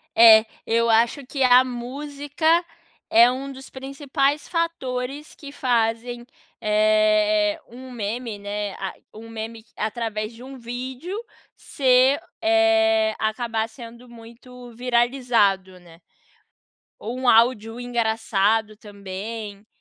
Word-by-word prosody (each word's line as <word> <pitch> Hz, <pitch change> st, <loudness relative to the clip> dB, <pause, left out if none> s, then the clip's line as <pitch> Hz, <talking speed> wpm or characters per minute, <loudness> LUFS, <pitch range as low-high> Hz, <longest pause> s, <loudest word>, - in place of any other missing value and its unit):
É, 220 Hz, -1 st, +8 dB, 0.2 s
eu 230 Hz, +1 st, +1 dB
acho 235 Hz, +5 st, +2 dB
que 270 Hz, +1 st, -2 dB
a 250 Hz, 0 st, +7 dB
música 280 Hz, +5 st, -6 dB, 0.6 s
é 235 Hz, +2 st, +7 dB
um 270 Hz, +2 st, -5 dB
dos 270 Hz, 0 st, -11 dB
principais 275 Hz, +2 st, -2 dB
fatores 295 Hz, -5 st, -3 dB
que 285 Hz, -2 st, -11 dB
fazem, 240 Hz, -2 st, -1 dB, 0.4 s
eh, 215 Hz, 0 st, +2 dB
um 255 Hz, +2 st, -11 dB
meme, 230 Hz, 0 st, -4 dB
né, 205 Hz, 0 st, -4 dB
a 190 Hz, -1 st, -5 dB, 0.2 s
um 225 Hz, +1 st, -11 dB
meme 225 Hz, 0 st, -7 dB
através 215 Hz, 0 st, -3 dB
de 235 Hz, +2 st, -13 dB
um 270 Hz, 0 st, -10 dB
vídeo 255 Hz, -, -6 dB, 0.4 s
ser, 260 Hz, +1 st, +3 dB, 0.2 s
eh, 330 Hz, 0 st, +3 dB
acabar 220 Hz, 0 st, -1 dB
sendo 235 Hz, +1 st, -12 dB
muito 240 Hz, +2 st, -13 dB
viralizado, 235 Hz, -6 st, +1 dB
né. 170 Hz, -1 st, -18 dB, 1.0 s
Ou 240 Hz, +4 st, -6 dB
um 255 Hz, -1 st, -1 dB
áudio 225 Hz, -1 st, +3 dB
engraçado 220 Hz, -3 st, 0 dB
também, 205 Hz, 0 st, -8 dB
235 Hz, 110 wpm, -23 LUFS, 220-260 Hz, 1.0 s, É